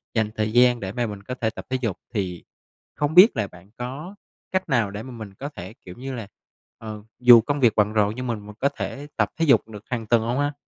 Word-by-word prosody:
dành 110 Hz, -1 st, +1 dB
thời 110 Hz, 0 st, -1 dB
gian 120 Hz, 0 st, +5 dB
để 95 Hz, -1 st, -4 dB
mà 120 Hz, 0 st, -1 dB
mình 100 Hz, -2 st, -8 dB
có 125 Hz, -, -5 dB
thể 110 Hz, -, +2 dB
tập 110 Hz, -, -9 dB
thể 130 Hz, -, 0 dB
dục. 105 Hz, -7 st, -1 dB, 0.2 s
Thì 90 Hz, -5 st, -3 dB, 0.5 s
không 145 Hz, +1 st, -1 dB
biết 190 Hz, -, +8 dB
là 105 Hz, -, 0 dB
bạn 90 Hz, +1 st, -17 dB
có 140 Hz, +11 st, -6 dB, 0.4 s
cách 185 Hz, -2 st, -1 dB
nào 115 Hz, -7 st, +2 dB
để 105 Hz, +2 st, -6 dB
mà 130 Hz, -, -9 dB
mình 110 Hz, -5 st, -9 dB
có 140 Hz, +9 st, -6 dB
thể, 95 Hz, -7 st, -9 dB
kiểu 90 Hz, -, -9 dB
như 135 Hz, +2 st, -6 dB
là, 115 Hz, -5 st, -6 dB, 0.5 s
ờ, 110 Hz, -1 st, -8 dB, 0.2 s
dù 120 Hz, -2 st, +9 dB
công 145 Hz, +5 st, -2 dB
việc 120 Hz, -4 st, +4 dB
bận 105 Hz, 0 st, +2 dB
rộn 105 Hz, -1 st, +2 dB
nhưng 125 Hz, 0 st, -4 dB
mà 120 Hz, -, 0 dB
mình 105 Hz, 0 st, -11 dB
có 140 Hz, -, +2 dB
thể 140 Hz, 0 st, -6 dB
tập -, -, +2 dB
thể 165 Hz, -, +2 dB
dục 135 Hz, -5 st, +4 dB
được 105 Hz, -2 st, -10 dB
hàng 120 Hz, -3 st, -2 dB
tuần 115 Hz, 0 st, +4 dB
hông 120 Hz, +4 st, -1 dB
ha? 145 Hz, 0 st, 0 dB
115 Hz, 260 wpm, -24 LUFS, 105-130 Hz, 0.5 s, dù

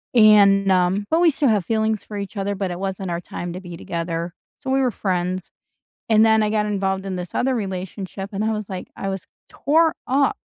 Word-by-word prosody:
And, 200 Hz, -3 st, +6 dB
um, 185 Hz, +2 st, +2 dB
but 325 Hz, +2 st, +3 dB
we 350 Hz, -, +6 dB
still 280 Hz, -2 st, +2 dB
have 205 Hz, -5 st, +1 dB
feelings 220 Hz, -1 st, 0 dB
for 210 Hz, -, -8 dB
each 200 Hz, +1 st, -6 dB
other, 200 Hz, +1 st, -1 dB
but 190 Hz, -2 st, -2 dB
it 175 Hz, -, -5 dB
wasn't 190 Hz, -1 st, -3 dB
our 170 Hz, 0 st, -2 dB
time 175 Hz, 0 st, -6 dB
to 185 Hz, -, -7 dB
be 175 Hz, -2 st, -8 dB
together, 170 Hz, 0 st, -4 dB, 0.3 s
so 265 Hz, -, -6 dB
we 270 Hz, +1 st, +2 dB
were 255 Hz, -2 st, +2 dB
friends. 185 Hz, -2 st, -2 dB, 0.6 s
And 220 Hz, -1 st, +5 dB
then 220 Hz, 0 st, +4 dB
I 210 Hz, -, +1 dB
got 210 Hz, -1 st, +1 dB
involved 195 Hz, -2 st, -1 dB
in 190 Hz, -1 st, -3 dB
this 180 Hz, -1 st, -6 dB
other 260 Hz, +1 st, +1 dB
relationship, 195 Hz, -1 st, -5 dB
and 200 Hz, +2 st, -2 dB
I 220 Hz, -, +1 dB
was 215 Hz, -2 st, -4 dB
like, 185 Hz, -2 st, -6 dB
I 195 Hz, -, -4 dB
was 195 Hz, -2 st, -4 dB, 0.2 s
tore 320 Hz, +3 st, +2 dB
up 275 Hz, +2 st, +2 dB
195 Hz, 225 wpm, -22 LUFS, 185-220 Hz, 0.6 s, And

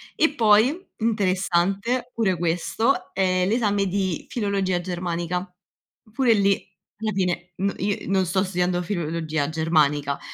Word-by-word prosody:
E 320 Hz, -2 st, +2 dB
poi, 225 Hz, -, +4 dB, 0.2 s
interessante 200 Hz, +3 st, 0 dB
pure 195 Hz, -6 st, +1 dB
questo, 175 Hz, -, 0 dB
è 185 Hz, -1 st, +2 dB
l'esame 205 Hz, -2 st, +1 dB
di 190 Hz, -3 st, -2 dB
filologia 200 Hz, -5 st, 0 dB
germanica, 175 Hz, 0 st, -3 dB, 0.6 s
pure 245 Hz, 0 st, +3 dB
lì 200 Hz, -2 st, +4 dB, 0.5 s
alla 220 Hz, -1 st, -1 dB
fine 180 Hz, -2 st, -1 dB
no 195 Hz, +1 st, 0 dB
io 200 Hz, +1 st, -1 dB
non 190 Hz, -1 st, +2 dB
sto 190 Hz, +3 st, +1 dB
studiando 180 Hz, -1 st, 0 dB
filologia 160 Hz, -4 st, -2 dB
germanica. 150 Hz, -3 st, +1 dB
190 Hz, 120 wpm, -24 LUFS, 175-210 Hz, 0.6 s, poi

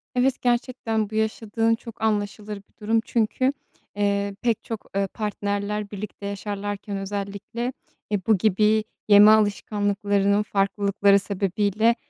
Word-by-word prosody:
Evet, 255 Hz, +1 st, +2 dB
gerçekten 240 Hz, -3 st, 0 dB
bu 220 Hz, -, -7 dB
yaşadığın 220 Hz, +1 st, +1 dB
çok 225 Hz, 0 st, -12 dB
anlaşılır 210 Hz, -1 st, -1 dB
bir 200 Hz, -, -19 dB
durum. 225 Hz, +1 st, +2 dB
Çünkü, 250 Hz, +4 st, +1 dB, 0.4 s
eee, 200 Hz, -1 st, 0 dB
pek 230 Hz, -3 st, 0 dB
çok, 225 Hz, -2 st, -6 dB
eee, 195 Hz, 0 st, +1 dB
partnerler 205 Hz, 0 st, -3 dB
birlikte 205 Hz, 0 st, -7 dB
yaşarlarken 200 Hz, 0 st, -4 dB
özellikle, 200 Hz, +5 st, -4 dB, 0.4 s
e, 195 Hz, -3 st, -1 dB
bu 220 Hz, -, +5 dB
gibi 215 Hz, +2 st, +3 dB, 0.2 s
yeme 210 Hz, +1 st, +8 dB
alışkanlıklarının 205 Hz, -1 st, +2 dB
farklılıkları 200 Hz, 0 st, +2 dB
sebebiyle, 200 Hz, +3 st, +1 dB
205 Hz, 120 wpm, -24 LUFS, 200-220 Hz, 0.4 s, yeme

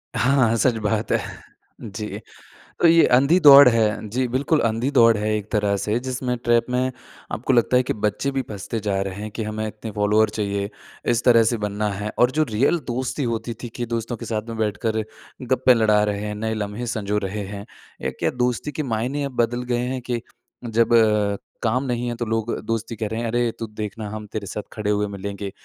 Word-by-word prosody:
हाँ, 125 Hz, -3 st, +3 dB
सच 115 Hz, +2 st, +2 dB
बात 105 Hz, +1 st, -1 dB
है। -, -, +3 dB, 0.6 s
जी। 105 Hz, 0 st, -6 dB, 0.6 s
तो -, -, +5 dB
ये 165 Hz, 0 st, +6 dB
अंधी 140 Hz, +8 st, +4 dB
दौड़ 140 Hz, -3 st, +10 dB
है 110 Hz, -2 st, +1 dB
जी 125 Hz, +2 st, 0 dB
बिल्कुल, 140 Hz, +5 st, +1 dB
अंधी 115 Hz, +4 st, 0 dB
दौड़ 115 Hz, -4 st, +5 dB
है 105 Hz, +1 st, -1 dB
एक 105 Hz, 0 st, -6 dB
तरह 105 Hz, -2 st, +1 dB
से 105 Hz, +4 st, -1 dB
जिसमें 125 Hz, -1 st, -2 dB
ट्रैप 120 Hz, -1 st, +3 dB
में 130 Hz, +1 st, +1 dB, 0.4 s
आपको 125 Hz, -, -1 dB
लगता 125 Hz, 0 st, +3 dB
है 125 Hz, -, +5 dB
कि -, -, -2 dB
बच्चे 105 Hz, +6 st, -1 dB
भी 135 Hz, -1 st, -1 dB
फँसते 105 Hz, +2 st, -5 dB
जा 100 Hz, -2 st, -1 dB
रहे 95 Hz, -1 st, -4 dB
हैं 110 Hz, -, -5 dB
कि 110 Hz, +2 st, -5 dB
हमें 110 Hz, 0 st, -3 dB
इतने 110 Hz, +1 st, -7 dB
फॉलोअर्स 105 Hz, +1 st, +2 dB
चाहिए, 100 Hz, -1 st, -2 dB, 0.4 s
इस 120 Hz, 0 st, +1 dB
तरह 115 Hz, -2 st, +6 dB
से 120 Hz, -, 0 dB
बनना 105 Hz, 0 st, -2 dB
है 105 Hz, +2 st, -4 dB
और 125 Hz, -, +5 dB
जो 155 Hz, +4 st, +1 dB
रियल 130 Hz, +10 st, +2 dB
दोस्ती 130 Hz, +4 st, -2 dB
होती 115 Hz, +1 st, -4 dB
थी 120 Hz, -, -4 dB
कि 120 Hz, -, -3 dB
दोस्तों 115 Hz, +1 st, -3 dB
के -, -, -8 dB
साथ 110 Hz, 0 st, -3 dB
में 115 Hz, -, -5 dB
बैठकर 110 Hz, +1 st, -1 dB, 0.4 s
गप्पे 130 Hz, 0 st, +4 dB
लड़ा 110 Hz, -2 st, +3 dB
रहे 105 Hz, -1 st, -2 dB
हैं, 105 Hz, -, -4 dB
नए 110 Hz, +1 st, -2 dB
लम्हे 105 Hz, +3 st, -4 dB
संजो 105 Hz, -3 st, -1 dB
रहे 100 Hz, +1 st, -3 dB
हैं, 100 Hz, 0 st, -7 dB, 0.4 s
ये -, -, -1 dB
क्या -, -, +1 dB
दोस्ती 125 Hz, +4 st, -2 dB
के 155 Hz, -, -3 dB
मायने 130 Hz, +4 st, -2 dB
अब 135 Hz, -3 st, -6 dB
बदल 120 Hz, +1 st, -3 dB
गए 120 Hz, -, +1 dB
हैं 130 Hz, 0 st, -3 dB
कि 120 Hz, -1 st, 0 dB, 0.4 s
जब 115 Hz, 0 st, +2 dB, 0.7 s
काम 125 Hz, +4 st, +1 dB
नहीं 120 Hz, -1 st, -2 dB
है 120 Hz, -, -2 dB
तो 120 Hz, -, -2 dB
लोग 115 Hz, +1 st, -1 dB
दोस्ती 115 Hz, 0 st, -3 dB
कह 110 Hz, -, -3 dB
रहे 110 Hz, +2 st, -3 dB
हैं, 120 Hz, -, -2 dB
अरे! 120 Hz, +1 st, +1 dB
तू 115 Hz, -, -4 dB
देखना 105 Hz, 0 st, -6 dB
हम 105 Hz, 0 st, -6 dB
तेरे 105 Hz, -2 st, -4 dB
साथ 105 Hz, -, -5 dB
खड़े 105 Hz, -1 st, -2 dB
हुए 105 Hz, 0 st, +1 dB
मिलेंगे 100 Hz, 0 st, -5 dB
115 Hz, 215 wpm, -22 LUFS, 105-125 Hz, 0.7 s, दौड़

